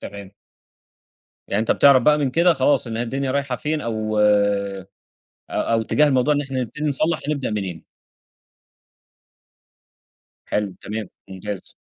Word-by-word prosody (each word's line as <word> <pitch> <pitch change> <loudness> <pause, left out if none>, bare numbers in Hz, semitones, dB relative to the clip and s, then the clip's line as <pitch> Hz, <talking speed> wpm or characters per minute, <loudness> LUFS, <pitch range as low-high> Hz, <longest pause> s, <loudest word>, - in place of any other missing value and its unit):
تمام. 100 -1 -9 1.2
يعني 100 - 0
أنت 110 - -1
بتعرَف 140 -3 +6
بقى 150 +3 +4
من 140 -3 0
كده 170 +5 +4
خلاص 135 -1 +2
إن 115 -1 -4
هي 115 - -1
الدنيا 135 +3 -2
رايحة 140 -2 -1
فين 155 +1 -2
أو، 110 -3 -2
أ 100 -2 +2 0.6
أو 115 -1 0
إتجاه 150 +6 +3
الموضوع 135 +1 +2
إن 145 - 0
إحنا 135 -2 -3
نبتدي 150 +5 -5
نصلّح 155 +4 0
نبدأ 140 -4 -1
منين. 95 -6 -4 2.6
حلو، 105 -3 -2
تمام، 110 -1 -5 0.2
ممتاز. 95 +1 -7
115 Hz, 135 wpm, -22 LUFS, 105-140 Hz, 2.6 s, بتعرَف